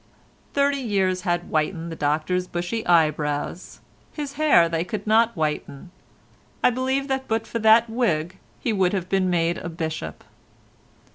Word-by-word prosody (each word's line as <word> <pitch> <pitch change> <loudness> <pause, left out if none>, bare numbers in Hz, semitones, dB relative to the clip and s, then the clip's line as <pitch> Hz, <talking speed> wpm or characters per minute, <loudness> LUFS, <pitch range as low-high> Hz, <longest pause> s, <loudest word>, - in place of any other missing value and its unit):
Thirty 280 0 +2
years 190 -6 0
had 175 -2 0
whitened 165 +2 -2
the - - -5
Doctor's 155 +5 0
bushy 175 +7 -3
eyebrows—his 160 - -1
hair 285 - +4
they 165 0 -1
could 205 +2 -5
not 225 +2 +3
whiten. 150 +1 -3 0.7
I - - +5
believe 260 +2 -1
that 265 -1 -2
but 225 0 -1
for 230 - -4
that 220 +1 +5
wig 190 -7 -1 0.2
he 230 - -1
would 190 -2 +2
have 185 -2 -2
been 190 -1 +1
made 170 -1 +1
a 175 - -6
bishop. 160 -2 -5
185 Hz, 145 wpm, -23 LUFS, 165-230 Hz, 0.7 s, I